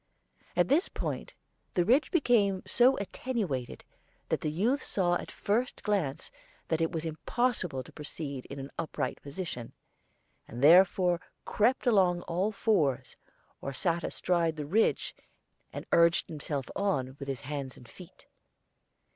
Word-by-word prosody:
At 175 -1 +3
this 310 - +2
point - - -4 0.4
the 175 - +3
ridge 260 - +4
became 210 - +2
so 255 +2 +4
attenuated 200 - -3 0.5
that - - 0
the 155 - -1
youth 220 - +1
saw 175 -3 +1
at 175 - -2
the - - -11
first 235 +5 -1
glance 190 -10 -1 0.4
that 160 0 +1
it 165 - +1
was 165 -2 -3
impossible 165 - -1
to - - -14
proceed 145 -3 -7
in 140 - -8
an 135 0 -7
upright 165 -3 -3
position; 140 -6 -6 0.8
he - - -10
therefore 175 +5 +5 0.2
crept 235 +5 +2
along 185 -7 +4
on - - -12
all 185 +5 -1
fours, 145 - +1 0.5
or 140 - -4
sat 170 +4 0
astride 170 -3 0
the 150 -1 -4
ridge 210 +10 +1 0.6
and - - -6
urged 170 0 +4
himself 145 -3 -3
on 135 -10 -1
with 140 - -6
his 135 -3 -3
hands 140 -2 -5
and 125 - -14
feet. 175 +9 -14
170 Hz, 145 wpm, -30 LUFS, 140-200 Hz, 0.8 s, therefore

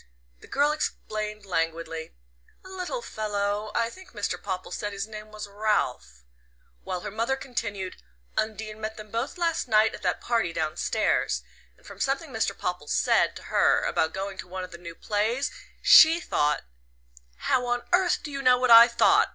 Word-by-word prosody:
The - - -15
girl 290 +1 +2
explained 215 -8 -4
languidly: 165 - -3 0.5
"A - - -11
little 380 +6 -4
fellow 205 0 -2
I 230 0 +1
think 375 0 -14
Mr. 205 -2 -3
Popple 185 -2 -4
said 205 -1 -4
his 200 0 -3
name 215 -1 -10
was 210 -1 -7
Ralph"; 200 - -1 0.6
while 180 -1 -4
her 210 - -6
mother 230 +5 0
continued: 210 -8 -4 0.4
"Undine 215 0 -3
met 215 0 -4
them 215 -1 -10
both 240 +9 -3
last 335 -5 0
night 220 -1 +4
at - - -8
that - - 0
party 225 -8 0
downstairs. 155 - 0 0.3
And - - -25
from - - -11
something - - -1
Mr. - - -1
Popple - - -3
said - - +2
to - - -10
her - - +4
about 160 - +1
going 195 +1 -5
to - - -7
one 185 +1 -5
of 185 - -8
the 170 - -10
new 170 -1 -9
plays, 220 +8 -1 0.3
she 325 +2 +8
thought 150 - 0 0.4
" - - -27
"How 250 -1 +2
on 245 0 0
earth 360 -1 +3
do 295 - -6
you 275 0 -4
know 255 -2 +5
what 250 -1 +2
I 230 +1 +11
thought?" 235 -1 +4
215 Hz, 180 wpm, -26 LUFS, 185-245 Hz, 0.6 s, I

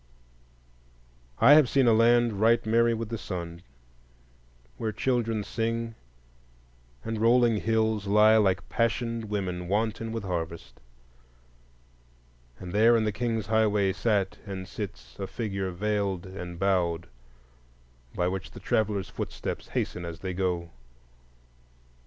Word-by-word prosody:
I 145 - +7
have 150 -5 +6
seen 135 -2 +3
a 115 - +5
land 115 -2 +3
right 115 +1 +4
merry 115 +1 +3
with 115 -1 -5
the 115 -2 -4
sun, 85 -2 -6 1.2
where 110 - -2
children 115 -3 0
sing, 115 +1 -2 1.1
and 110 -1 -3
rolling 120 -1 +4
hills 110 -1 0
lie 105 +2 +6
like 95 -4 +1
passioned 115 0 -1
women 95 -4 -3
wanton 110 +3 -1
with 115 -2 -4
harvest. 85 -3 -5 1.8
And 90 -1 -8
there 115 +3 +5
in 110 - +1
the 105 - 0
King's 115 -1 -2
Highways 105 -2 +2
sat 100 0 0
and 95 -1 -6
sits 65 - -8
a 95 - -3
figure 95 -5 -3
veiled 100 -1 -2
and 90 -2 -7
bowed, 85 -3 0 1.1
by 90 - +1
which 95 0 -4
the - - -11
traveller's 105 -3 0
footsteps - - -5
hasten 90 - -3
as 85 0 -7
they 95 -1 -3
go. 90 -2 -2
105 Hz, 125 wpm, -27 LUFS, 95-115 Hz, 1.8 s, I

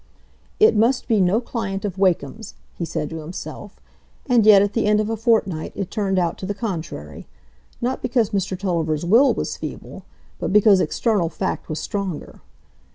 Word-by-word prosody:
"It 435 - +6
must 235 +4 +2
be 220 -4 +3
no 185 +4 +3
client 215 -5 -4
of 190 -2 -4
Wakem's," 185 +1 0 0.2
he 170 - -3
said 150 -2 -3
to 160 - -5
himself; 170 +5 -8 0.5
and 240 -5 +3
yet 200 -2 +8
at 205 0 -1
the 225 -3 +1
end 210 0 +3
of 215 +1 -1
a - - 0
fortnight 215 -8 0
it 195 -3 -4
turned 195 -3 -1
out 175 -2 0
to 185 - -5
the 205 - -3
contrary; 190 -7 -6 0.5
not 250 +2 -1
because 235 -3 +1
Mr 190 -2 -1
Tulliver's 170 -4 -1
will 235 +10 +5
was - - -3
feeble, - - -8 0.4
but - - -2
because 205 -1 +6
external 185 +1 0
fact 185 +3 -4
was 155 - -3
stronger. 195 -5 -5
200 Hz, 175 wpm, -22 LUFS, 180-225 Hz, 0.5 s, yet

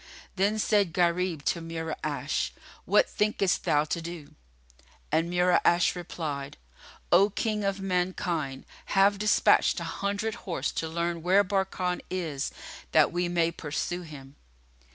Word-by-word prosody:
Then 200 +3 +1
said 205 -5 +2
Gharib 175 -3 +1
to 170 - 0
Mura'ash, 165 -1 -3 0.4
"What - - +4
thinkest 210 -3 0
thou 150 -4 +3
to 165 +2 -3
do?" 165 -3 -8 0.8
And 165 +2 +1
Mura'ash 180 0 +3
replied, 155 -5 -5 0.5
"O 195 +4 +6
King 210 +1 -2
of 195 0 -1
mankind, 180 -7 -2
I - - -16
have 195 +1 +4
despatched 215 +1 +3
an - - -5
hundred 205 +2 -2 0.2
horse 170 - -1
to 160 - -3
learn 170 +1 -2
where 190 +4 +4
Barkan 190 -2 -1
is, 160 -7 -2 0.4
that - - +5
we 175 0 -1
may 170 -1 +1
pursue 170 +3 -3
him." 145 -4 -11
175 Hz, 135 wpm, -28 LUFS, 160-195 Hz, 0.8 s, O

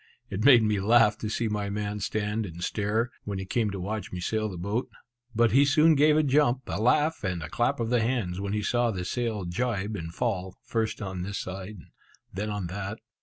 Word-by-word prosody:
It 100 +2 -2
made 125 -4 +8
me 105 -2 +1
laugh 110 +2 +5
to 110 - -3
see 115 +1 -1
my 105 -1 -2
man 105 0 -3
stand 105 +1 -2
and 85 0 -8
stare, 110 +5 0
when 100 -1 -4
he 95 - -4
came 110 +2 0
to 100 -1 -5
watch 105 +4 -4
me 90 - -5
sail 110 +4 -1
the 95 - -7
boat. 100 +8 -2 0.5
But 115 0 +4
he 135 +4 +6
soon 155 +3 +5
gave 150 +1 +4
a 155 - +4
jump, 135 -2 +2
a 100 - -3
laugh, 150 +6 +2
and 90 -4 -2
a 75 - -6
clap 120 - 0
of 115 0 -1
the 120 -2 +3
hands 110 -7 -1
when 100 0 -3
he 105 0 -1
saw 120 +2 +1
the 90 -5 -3
sail 110 -2 -2
jibe 105 +2 -2
and 80 -4 -5
fall, 95 -3 -2
first 110 -2 -2
on 95 -2 -4
this 100 +2 -4
side, 95 +2 -6 0.6
then 105 +3 -3
on 105 -3 -3
that. 100 +4 -5
105 Hz, 220 wpm, -27 LUFS, 95-120 Hz, 0.6 s, made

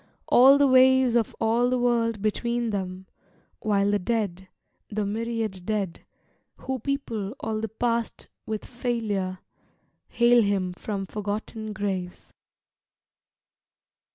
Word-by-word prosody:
All 265 +3 +7
the 285 - +4
waves 260 -1 +5
Of 230 -3 +1
all 230 +2 +2
the 255 - +1
world 230 -3 +1
between 235 +2 -1
them: 190 -2 -4 0.5
While 205 -1 +1
the 205 - +2
dead, 190 -3 -2 0.4
The 210 -1 -2
myriad 220 -2 -3
dead, 200 -3 -3 0.5
who 265 -1 -4
people 235 -5 -3
all 220 -1 -3
the 225 - -3
Past 235 +1 -2 0.2
With 215 -1 -4
failure, 220 -7 -2 0.7
hail 240 0 +4
him 195 -3 0
from 195 +1 -4
forgotten 215 +2 -5
graves. 190 -4 -4
220 Hz, 115 wpm, -26 LUFS, 200-240 Hz, 0.7 s, All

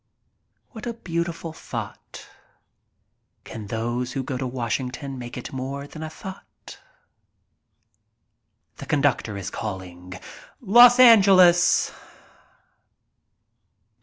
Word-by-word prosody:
What 225 -1 -9
a 235 - -4
beautiful 170 -4 -4
thought. - - -8 1.2
Can 110 -2 -9
those 120 +3 -3
who 135 - -3
go 130 - -5
to 130 0 -3
Wash 120 -2 -2
ington 130 +1 -7
make 120 0 -8
it 125 - -8
more 135 +2 -5
than 155 +2 -11
a 160 - -5
thought? 190 +4 -12 2.0
The - - -10
conductor 140 -8 0
is 100 0 -6
calling: 90 -3 -7 0.5
"Los 240 +3 +7
Angeles." 190 -7 +6
140 Hz, 100 wpm, -23 LUFS, 120-175 Hz, 2.0 s, Los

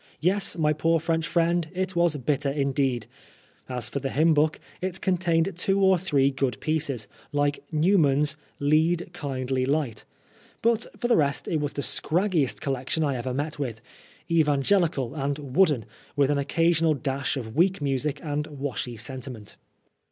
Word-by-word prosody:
Yes, 190 +3 +2
my 155 -2 +2
poor 165 +2 +2
French 165 0 -1
friend, 170 -1 +1
it 185 0 -2
was 170 -2 +3
bitter 145 +1 0
indeed! 135 -3 0 0.6
As 125 -2 -1
for 140 - -3
the 135 - -3
hymn 160 +4 +3
book, 155 +1 +2 0.2
it 185 0 -3
contained 180 -1 +1
two 195 +3 +1
or 190 -2 +4
three 140 -6 +2
good 135 -1 -1
pieces, 145 -8 -1 0.2
like 145 0 0
Newman's 150 -4 +3 0.2
" - - -39
Lead, 165 +3 +2
Kindly 130 -2 -2
Light," 135 -4 -1 0.6
but 230 0 +2
for 240 - -1
the 240 - +4
rest 140 -3 +1
it 160 - 0
was 145 -1 -2
the 140 - -3
scraggiest 170 -5 0
collection 135 +3 -1
I 140 -3 0
ever 125 +1 -3
met 145 +3 -3
with 120 -6 -3 0.3
— - - -27
evan 150 -4 +2
gelical 160 -8 +1
and 140 -1 -1 0.2
wooden, 150 - +4 0.3
with 145 -1 +3
an 145 - +1
occasional 165 +2 +2
dash 135 0 -2
of 110 -4 -6
weak 185 +4 +3
music 140 0 -1
and 150 -1 -2
washy 135 -4 -4
sentiment. 125 -2 -6
150 Hz, 165 wpm, -26 LUFS, 135-165 Hz, 0.6 s, or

